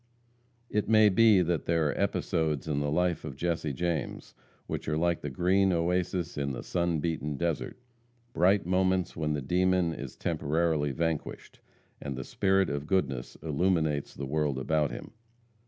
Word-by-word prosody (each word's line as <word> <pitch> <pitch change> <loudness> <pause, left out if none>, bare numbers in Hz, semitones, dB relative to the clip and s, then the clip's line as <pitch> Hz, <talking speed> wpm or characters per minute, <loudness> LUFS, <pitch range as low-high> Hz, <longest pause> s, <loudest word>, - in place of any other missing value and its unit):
It 105 0 0
may 110 -1 +6
be 105 -1 +5
that 85 -1 -1
there 80 -3 +2
are - - -1
episodes 80 -3 -1
in 75 -2 0
the 75 0 -1
life 90 +2 0
of 70 - -6
Jesse 80 0 -1
James 85 0 -3 0.3
which - - -4
are 75 - 0
like 85 +1 +1
the 75 - -4
green 95 +7 +2
oasis 90 -1 -1
in 70 -1 -1
the - - -6
sun 85 -2 0
beaten 75 -2 -2
desert 85 -1 -2 0.6
bright 95 +3 +3
moments 95 0 +1
when 75 -2 -1
the 75 -2 -3
demon 90 +2 +2
is 70 -4 -7
temporarily 75 -1 0
vanquished, 80 +1 -3 0.4
and 70 -2 -4
the 65 - -5
spirit 95 +5 +1
of 70 +1 -4
goodness 75 -10 -1
illuminates 80 -2 0
the 70 - -5
world 75 -1 0
about 75 +2 +1
him. - - -8
80 Hz, 160 wpm, -29 LUFS, 75-90 Hz, 0.6 s, may